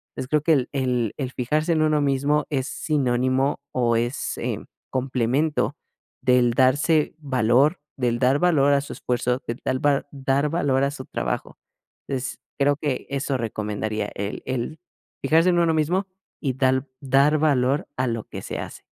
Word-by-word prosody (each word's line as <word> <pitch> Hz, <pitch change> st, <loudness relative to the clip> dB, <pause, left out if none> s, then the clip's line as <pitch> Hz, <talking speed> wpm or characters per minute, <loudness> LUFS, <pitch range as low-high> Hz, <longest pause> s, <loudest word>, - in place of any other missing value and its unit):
Entonces 130 Hz, -, -4 dB
creo 150 Hz, -1 st, +3 dB
que 160 Hz, +2 st, +3 dB
el 130 Hz, -4 st, +1 dB
el 125 Hz, -5 st, 0 dB
el 130 Hz, -3 st, -3 dB
fijarse 150 Hz, +7 st, 0 dB
en 155 Hz, -, +2 dB
uno 155 Hz, -1 st, +2 dB
mismo 140 Hz, +1 st, +1 dB
es 135 Hz, -3 st, -1 dB
sinónimo, 130 Hz, -1 st, 0 dB
o, 120 Hz, -2 st, +2 dB
es, 120 Hz, +3 st, -1 dB
eh, -, -, -2 dB, 0.3 s
complemento 130 Hz, +3 st, 0 dB, 0.5 s
del 125 Hz, -2 st, +3 dB
darse 145 Hz, +5 st, +3 dB
valor, 135 Hz, +2 st, +2 dB, 0.2 s
del 120 Hz, -2 st, +1 dB
dar 130 Hz, +3 st, +3 dB
valor 145 Hz, -5 st, +4 dB
a 140 Hz, -, +3 dB
su 140 Hz, -, -9 dB
esfuerzo, 125 Hz, +1 st, -1 dB
de 115 Hz, -, -2 dB
tal 130 Hz, +3 st, -2 dB
va 140 Hz, -2 st, +3 dB
dar 140 Hz, +1 st, 0 dB
valor 145 Hz, -5 st, +1 dB
a 140 Hz, -, +1 dB
su 130 Hz, -2 st, -8 dB
trabajo. -, -, -3 dB, 0.5 s
Entonces, 130 Hz, -1 st, -3 dB, 0.2 s
creo 145 Hz, 0 st, +3 dB
que 145 Hz, -3 st, -2 dB
eso 140 Hz, -1 st, -1 dB
recomendaría 105 Hz, -2 st, -3 dB
el 100 Hz, +1 st, -4 dB
el 130 Hz, +5 st, -3 dB, 0.4 s
fijarse 165 Hz, +3 st, +4 dB
en 175 Hz, -1 st, +3 dB
uno 165 Hz, -1 st, +3 dB
mismo, 175 Hz, +6 st, +1 dB, 0.4 s
y 135 Hz, -4 st, 0 dB
dal 130 Hz, +1 st, +1 dB
dar 140 Hz, +3 st, +4 dB
valor 140 Hz, 0 st, +2 dB
a 130 Hz, -, +1 dB
lo 115 Hz, -2 st, -2 dB
que -, -, -8 dB
se -, -, -5 dB
hace. -, -, -8 dB
135 Hz, 165 wpm, -24 LUFS, 125-150 Hz, 0.5 s, valor